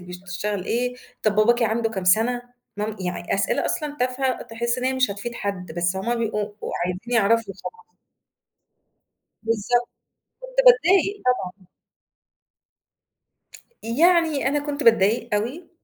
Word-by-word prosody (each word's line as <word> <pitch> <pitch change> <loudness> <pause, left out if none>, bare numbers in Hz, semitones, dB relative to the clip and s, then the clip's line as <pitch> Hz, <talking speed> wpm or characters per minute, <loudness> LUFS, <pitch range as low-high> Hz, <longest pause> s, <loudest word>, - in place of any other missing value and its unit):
بي 180 0 -11
تشتغل 185 +2 -3
إيه؟ 245 +2 -1 0.3
طَب 215 -1 +2
باباكِ 235 +3 +4
عنده 225 0 +1
كام 190 -4 -4
سَنة؟ 230 +6 +3 0.3
مام 210 +1 -3
يعني 180 -1 -2
أسئلة 195 0 0
أصلًا 295 -1 -2
تافهة 255 +1 0
تحس 235 +1 -2
إن 250 - -3
هي 260 - +2
مش 255 -4 +2
هتفيد 220 +4 -5
حد، 185 -6 -4
بس 175 +2 0
هُم 235 +5 -1
بيبقوا 220 -3 -1 0.2
وعايزين 180 +1 -3
يعرفوا 225 -2 +2
وخلاص. 450 0 -9 1.6
بالضبط، 230 +2 0 0.5
كنت - - -11
باضايِق 400 -4 +5
طبعًا. 190 -7 -1 2.2
يعني 315 +2 +3
أنا 290 - +1
كنت 290 0 -3
باتضايق 225 +1 +3
أوي، 250 +12 -3
230 Hz, 130 wpm, -23 LUFS, 200-255 Hz, 2.2 s, باضايِق